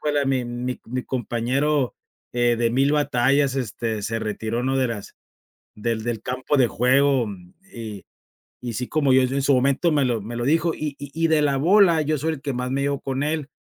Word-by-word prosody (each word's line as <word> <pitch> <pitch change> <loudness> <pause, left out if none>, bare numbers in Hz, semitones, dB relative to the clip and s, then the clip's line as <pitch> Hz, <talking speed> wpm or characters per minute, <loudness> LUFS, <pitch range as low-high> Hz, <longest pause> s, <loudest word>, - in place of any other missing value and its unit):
"Híjole, 145 -2 0
mi 130 -2 +1
mi 120 +1 -4
mi 125 +2 -4
compañero, 130 +2 0 0.4
eh, 120 -1 +2
de 115 0 +1
1000 135 +4 +2
batallas, 140 -1 +2
este, 115 -3 -3
se 115 +2 -2
retiró, 110 +2 -3
¿no?, 135 +1 0
de 130 -1 +1
las 105 -4 -6 0.6
del 110 +1 -2
del 115 -3 -3
campo 130 +4 -1
de 130 - +5
juego", 130 0 +3 0.5
y 110 -5 -7 0.6
y 120 -1 -5
sí, 125 +3 -4
como 145 -4 +2
yo 130 - +6
en 135 +2 0
su 140 - +3
momento 140 +6 +2
me 145 -2 +2
lo 120 -3 0
me 115 +3 -6
lo 120 - -2
dijo, 165 +4 +2
y 150 -2 -4
y 145 -1 -8
y 165 0 +1
de 155 -2 +3
la 140 -2 +2
bola, 175 +1 +5
yo 155 0 0
soy 160 +3 -1
el 135 - -10
que 140 - -2
más 125 +1 -3
me 140 +1 0
llevo 140 0 -1
con 135 0 -3
él, 150 -1 -2
130 Hz, 210 wpm, -23 LUFS, 120-145 Hz, 0.6 s, yo